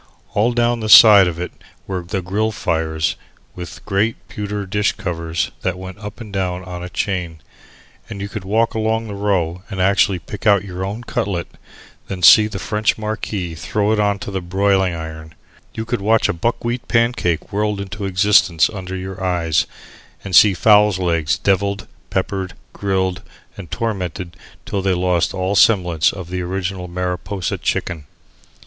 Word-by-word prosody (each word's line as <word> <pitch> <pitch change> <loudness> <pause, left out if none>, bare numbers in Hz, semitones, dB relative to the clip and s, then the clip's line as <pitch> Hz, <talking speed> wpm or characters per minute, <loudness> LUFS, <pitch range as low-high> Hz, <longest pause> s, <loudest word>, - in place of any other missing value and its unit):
All 110 +4 +2
down 120 0 +1
the 110 -1 -3
side 105 -4 +9
of 85 -2 -3
it 90 - -4 0.3
were 95 -2 -3
the 90 +2 -4
grill 105 +5 0
fires, 80 -5 -1 0.4
with 90 -2 -9
great 105 +3 +1
pewter 105 -1 -4
dish 100 +2 0
covers 85 -3 -3
that 90 -1 -2
went 95 +1 -9
up 105 +1 -8
and 110 -4 -9
down 90 -2 -2
on 90 -1 -7
a 90 - -6
chain, 90 -4 -3 0.7
and 100 -3 -7
you 100 - -4
could 105 -1 -6
walk 110 +4 +1
along 110 +1 0
the 105 - -6
row 95 -4 -1
and 95 -3 -6
actually 100 0 +3
pick 105 +6 -6
out 100 -2 +4
your 95 -1 -5
own 105 +5 -4
cutlet 100 -8 -2
and - - -25 0.5
then 95 -2 -6
see 105 +4 +8
the 105 -2 -6
French 105 +3 0
marquis 105 -5 -4
throw 105 +6 -1
it 110 - +1
on 100 -1 +2
to 100 - -7
the 95 -1 -3
broiling 95 0 +1
iron; 80 -1 -8 0.4
you 110 - -4
could 120 -2 -2
watch 110 +2 +3
a - - 0
buckwheat 120 +6 -2
pancake 115 -10 0
whirled 105 0 0
into 100 +1 -5
existence 95 -3 +3
under 95 -3 -6
your 95 0 -6
eyes 85 -4 +1 0.6
and 95 -3 -2
see 100 +3 +7
fowls' 105 0 +5
legs 85 -5 0
devilled, 100 0 0 0.2
peppered, 95 0 -2 0.2
grilled, 95 -2 -1 0.3
and 95 -5 -9
tormented 90 -6 -4 0.3
till 100 - -2
they 95 -1 +1
lost 90 -1 +1
all 95 +2 -1
semblance 90 -7 +4
of 90 -3 -9
the 90 0 -2
original 95 0 -3
Mariposa 90 +2 -3
chicken. 75 -5 -2
95 Hz, 170 wpm, -19 LUFS, 90-105 Hz, 0.7 s, side